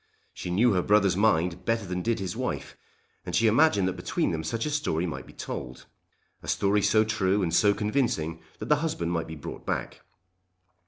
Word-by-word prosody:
She - - -6
knew 105 +6 +3
her 90 - +2
brother's 100 -1 +3
mind 90 -4 +2
better 115 -2 0
than 90 0 -3
did 115 +3 0
his 95 -4 -4
wife, - - -4 0.5
and 90 - -4
she 115 - +3
imagined 110 -4 +4
that 95 - -1
between 90 -1 -1
them 80 -1 -3
such 115 +8 -2
a 150 - -2
story 115 - 0
might 85 - -5
be - - -12
told, - - -7 0.6
a - - -12
story 100 +1 +2
so 110 +2 +4
true 105 -2 +1
and 85 -2 -1
so 105 +3 +5
convincing 105 - -1 0.2
that - - -6
the 150 - +5
husband 145 - -2
might 85 -2 -2
be 80 - -7
brought 75 - -8
back. - - -3
100 Hz, 200 wpm, -27 LUFS, 90-115 Hz, 0.6 s, so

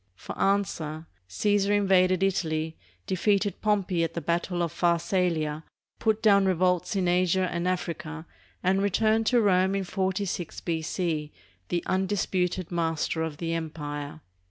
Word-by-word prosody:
For - - -8
answer, 170 -6 0 0.2
Caesar 205 - +1
invaded 190 -2 +3
Italy, 160 -4 0 0.3
defeated 200 +2 0
Pompey 195 -5 +1
at 165 0 -3
the - - -1
battle 170 +2 -1
of 170 - -2
Pharsalia, 170 -3 0 0.4
put 220 -1 +1
down 200 -3 +5
revolts 180 +2 +1
in 185 -2 +1
Asia 180 +1 +2
and 170 +1 -2
Africa, 165 -3 -3 0.4
and 190 +2 +2
returned 220 +3 +2
to 245 - +4
Rome 190 -2 +3
in 195 - 0
46 190 -2 -2
B.C., 160 -2 -2 0.4
the 175 -1 -1
undisputed 185 -2 -1
master 165 -1 -1
of 160 -2 -3
the 165 0 -2
empire. 150 -2 -5
180 Hz, 130 wpm, -27 LUFS, 165-195 Hz, 0.4 s, down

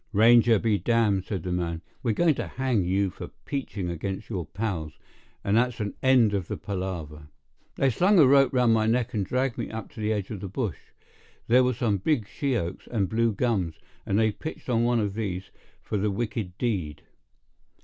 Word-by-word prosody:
"Ranger 115 +2 +6
be 105 -1 +1
damned!" 110 -5 +2
said 95 -6 -4
the 90 - -3
man. 85 -2 -2 0.2
"We're 115 -4 0
going 170 +3 +4
to - - -4
hang 125 -7 0
you 95 +1 +1
for - - -8 0.2
peaching 120 -9 -3
against 95 +6 -5
your 90 -6 -3
pals; 90 -8 -3 0.5
and 100 - +1
that's 125 +1 +2
an 105 -2 -2
end 125 -5 +4
of 95 -4 -1
the - - -4
palaver." 85 -6 -5 0.5
They 135 -1 +2
slung 190 - +3
a 155 - +8
rope 135 +1 +5
round 125 -3 +3
my 110 -1 +2
neck 120 +1 +1
and 105 -3 0
dragged 125 +4 -1
me - - -3
up 110 0 -7
to - - -12
the 110 0 0
edge 105 -2 -2
of 105 - -5
the 100 - -5
bush. 105 0 -3 0.7
There 125 +2 +5
were 125 -1 +1
some 110 -4 +1
big 115 - 0
she 140 +1 -1
oaks 90 -5 -4
and 100 -6 0
blue 115 +2 +2
gums, 100 -7 0 0.3
and 100 - 0
they 110 0 +3
pitched 155 +6 -8
on 115 -1 +2
one 120 0 +2
of 105 -2 -1
these 100 -4 -4 0.3
for 105 - -2
the 105 +2 +1
wicked 105 -3 -3
deed. 90 - -2
110 Hz, 200 wpm, -26 LUFS, 95-120 Hz, 0.7 s, a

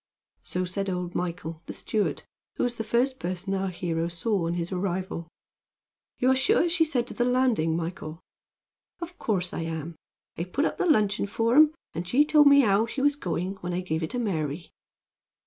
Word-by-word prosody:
So 180 0 -2
said 195 +2 -3
old 180 -1 -3
Michael, 165 -2 -4
the - - -5
steward, 215 -2 -1 0.3
who - - -1
was 240 -1 -1
the 225 - -2
first 245 +4 +1
person 185 +2 -3
our 195 0 0
hero 170 -2 -2
saw 175 +1 -1
on 170 - -1
his 175 +1 -3
arrival. 185 -2 -3 0.9
"You 255 +1 +3
are - - +4
sure 350 - +3
she 335 -1 +3
said 255 -6 0
to - - -7
the 240 - 0
landing, 245 -10 +2
Michael?" 165 -1 -5 0.8
"Of 350 +1 -8
course 180 -5 -1
I - - -3
am. 165 0 -4 0.4
I 170 - -1
put 275 - 0
up - - -2
the - - +1
luncheon 210 - +2
for 225 +3 +1
'em; 310 +1 +6 0.2
and 170 +2 -4
she 275 +10 +4
told 300 -1 +6
me 280 0 +8
how 215 -1 +3
she 235 +4 -5
was 290 0 +4
going 185 - -3
when 180 -1 -5
I 180 - -1
gave 160 -3 -2
it 160 - -2
to - - -4
Mary." 165 - -2
195 Hz, 200 wpm, -27 LUFS, 170-250 Hz, 0.9 s, me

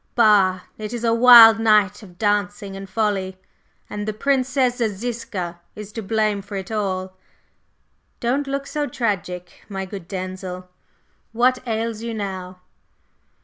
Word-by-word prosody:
Bah! 200 -6 +4 0.2
It 215 +1 -5
is 240 -1 -4
a 230 -1 +2
wild 230 -2 +9
night 210 -3 +3
of 180 -4 -15
dancing 205 -1 -1
and 195 0 -8
folly, 195 -4 -1 0.5
and 210 0 -5
the 215 - -1
Princess 260 +1 +1
Ziska 205 -6 -4
is 210 -1 -9
to 225 - -5
blame 215 -1 0
for 200 +1 -9
it 190 +2 -6
all! 190 -3 -2 1.0
Don't 270 +4 -1
look 275 0 -3
so 295 0 -3
tragic, 180 - -4
my 195 -1 -4
good 190 -3 -9
Denzil, 185 -1 -6 0.7
what 250 +2 +3
ails 225 -1 -2
you 230 -1 -4
now?" 185 -3 -6
210 Hz, 140 wpm, -22 LUFS, 190-230 Hz, 1.0 s, wild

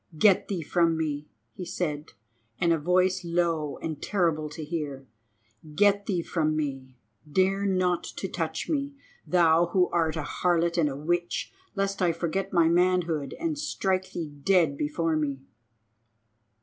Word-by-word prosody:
"Get 195 +3 +4
thee 185 -5 -3
from 165 +1 +2
me!" 150 -2 -3 0.2
he 185 - -7
said, 155 -4 -4 0.4
in 170 +6 +2
a 165 - +2
voice 185 +3 +2
low 170 -3 0
and 155 -3 -4
terrible 165 -6 0
to 150 +1 -7
hear; 145 -4 -4 0.7
"get 205 +2 +3
thee 180 -5 0
from 155 -3 0
me. 135 -4 -4 0.3
Dare 195 +4 +2
not 180 -2 +1
to - - -5
touch - - -3
me, 285 -2 -2 0.3
thou, 170 -1 +4
who 180 +1 +2
art 165 -2 +1
a 160 - -2
harlot 170 +1 +1
and 150 -3 +3
a 135 - -5
witch, 175 - -2 0.2
lest 195 0 -1
I 175 -2 +3
forget 175 +4 -2
my 170 -3 +4
manhood 170 -4 +1
and 320 -3 -2
strike 190 -10 -1
thee 160 -4 -4
dead 170 -6 +3
before 155 +3 -1
me." 140 -3 -2
170 Hz, 150 wpm, -27 LUFS, 155-185 Hz, 0.7 s, Get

